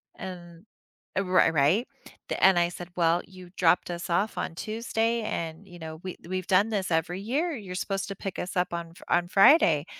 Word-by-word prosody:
And, 175 -1 -9 0.5
uh, 195 - +2
ri 185 0 +4
right? 160 - +2 0.4
Th - - -2
and 190 -1 +6
I 170 0 +2
said, 175 0 -9
"Well, 170 0 +2
you 185 -1 -13
dropped 175 0 +3
us 175 +1 -5
off 200 +5 0
on 165 - -3
Tuesday, 225 +2 -1
and, 165 -2 -4
you 175 - -12
know, 160 -1 -7
we 185 -1 -5
we've 185 0 -3
done 200 +4 +4
this 200 -4 -1
every 165 +3 0
year. 290 - -1
You're 190 -5 -7
supposed 195 +1 -2
to 195 - -5
pick 195 0 -6
us 180 - -5
up 180 -1 0
on 170 -1 -4
f 170 - -17
on 175 0 +2
Friday." 190 - +5
180 Hz, 205 wpm, -27 LUFS, 170-200 Hz, 0.5 s, and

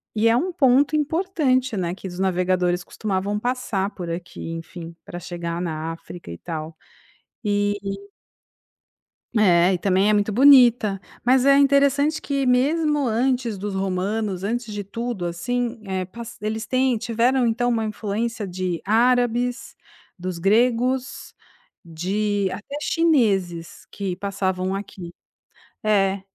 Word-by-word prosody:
E 220 +1 +3
é 230 - +4
um 350 +10 0
ponto 280 -2 +3
importante, 300 - +1
né, 175 -2 -1
que 190 +1 -8
os 175 0 -8
navegadores 180 -1 +1
costumavam 205 0 -2
passar 230 -5 -1
por 180 -3 -6
aqui, 170 -1 -6
enfim, 165 0 -8
pra 175 - -7
chegar 170 -1 -5
na 160 -2 -3
África 165 - -10
e 85 - -7
tal. 160 - -6 0.7
Eh 205 0 +1 1.6
É 185 -3 +5
e - - +1
também 190 +2 +2
é 215 - +4
muito 205 +1 +1
bonita. 240 -5 +6 0.3
Mas 255 +1 +4
é 275 0 +6
interessante 280 +2 +3
que, 275 -2 -1
mesmo 290 +3 +2
antes 240 -1 0
dos 200 +1 -4
romanos, 195 +1 -2
antes 230 +1 -3
de 205 0 -4
tudo, 230 -1 -4
assim, 230 +7 -2
eh, 190 -1 -2
passa 230 +4 -10
eles 220 +1 -3
têm 255 0 +1
tiveram 240 +3 +1
então 245 +2 +1
uma 230 -2 0
influência 215 +1 -3
de 180 -2 -3
árabes, 245 +3 +1 0.4
dos 180 -1 -5
gregos, 245 +6 +1 0.5
de 195 +4 -1
até 280 +7 -6
chineses 200 - +1
que 195 -3 -3
passavam 190 -1 -2
aqui. 190 -3 -7 0.7
É. 200 -2 +2
210 Hz, 130 wpm, -23 LUFS, 185-245 Hz, 1.6 s, bonita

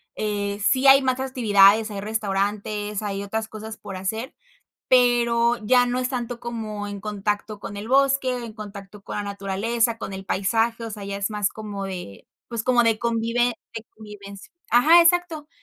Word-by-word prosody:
eh, 205 -1 -2
sí 260 +6 +2
hay 270 0 +8
más 260 -1 0
actividades, 220 -5 +4
hay 200 -2 -5
restaurantes, 205 0 -2
hay 200 -1 -3
otras 220 +2 -3
cosas 220 0 -8
por 200 -2 -8
hacer, 220 +7 -4 0.5
pero 240 -1 +3
ya 245 +3 +4
no 245 +1 -1
es 255 0 -1
tanto 245 -2 -4
como 220 -3 -5
en 205 0 -6
contacto 210 +1 -3
con 205 0 -7
el 205 +2 -6
bosque, 265 -1 +2
en 225 -2 -8
contacto 205 -1 -10
con - - -6
la 205 - -2
naturaleza, 205 +4 -1
con 195 - -6
el 190 0 -7
paisaje, 225 +5 0
o 225 - -5
sea, 210 -2 -7
ya 200 0 -4
es 200 +1 -2
más 210 -2 0
como 210 -2 -7
de, 180 - -8 0.2
pues, 230 -2 -4
como 250 -1 +3
de 225 -1 +2
convive 235 +1 0 0.2
de 225 - -5
convivencia. 200 -2 -11 0.2
Ajá, 315 +9 +7
exacto. 335 -3 +1
220 Hz, 175 wpm, -23 LUFS, 200-240 Hz, 0.5 s, hay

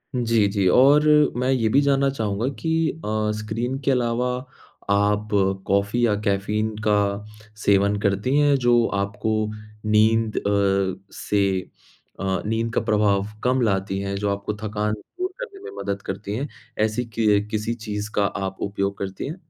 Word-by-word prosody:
जी, 115 -4 +2
जी, 100 -1 +1
और 140 +9 +6 0.3
मैं 125 +1 0
ये 120 -4 +2
भी 135 - +4
जानना 140 -1 +2
चाहूँगा 110 -3 -2
कि 165 - -2 0.4
अ, 110 0 0
स्क्रीन 115 +5 -3
के 140 - +3
अलावा 125 -1 +1 0.6
आप 105 +1 +2 0.4
कॉफ़ी 100 +5 +2
या 110 - +2
कैफ़ीन 105 +2 0
का 105 0 +1 0.4
सेवन 100 0 +3
करती 100 +6 +1
हैं 145 -1 +4
जो 120 -1 +5
आपको 105 +2 -2 0.5
नींद 110 +1 +3
अ, 100 -2 +1 0.2
से 105 -1 -1 0.8
अ, 95 -1 -1
नींद 115 +1 -1
का - - +1
प्रभाव 105 -3 +2 0.2
कम 125 +1 +2
लाती 95 -3 0
हैं 100 0 -3
जो 100 +1 -1
आपको 100 +1 -4
थकान 105 0 -1
दूर 360 - -5
करने 435 -6 -7
में - - -7
मदद 100 0 -3
करती 100 +1 -5
हैं? 135 +6 -2 0.3
ऐसी 110 +3 +1
कि 115 -1 -1
अ, 105 - -9
किसी 110 +1 -1
चीज़ 105 -3 -5
का 100 - +3
आप 95 -1 -3
उपयोग 100 0 -2
करती 95 -1 -5
हैं? 155 - -5
105 Hz, 160 wpm, -23 LUFS, 100-120 Hz, 0.8 s, और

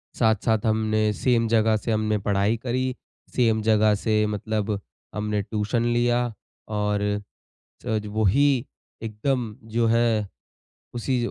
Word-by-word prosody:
साथ-साथ 110 -1 +2
हमने 110 -1 +2
सेम 115 +1 +1
जगह 110 -1 +3
से 115 - -3
हमने 110 -1 +1
पढ़ाई 100 +2 +1
करी, 130 +1 -2 0.4
सेम 115 -3 +3
जगह 110 -1 +4
से 105 +1 +1
मतलब 105 0 -2 0.4
हमने 105 -1 -1
ट्यूशन 105 +3 -1
लिया 120 0 +2 0.6
और 105 0 0 0.8
जज 110 -3 -1
वो 110 0 +1
ही 140 +10 +4 0.6
एकदम 115 +1 -2 0.2
जो 115 -1 +3
है 115 -2 +2 0.7
उसी 125 +2 0
110 Hz, 120 wpm, -24 LUFS, 105-120 Hz, 0.8 s, जगह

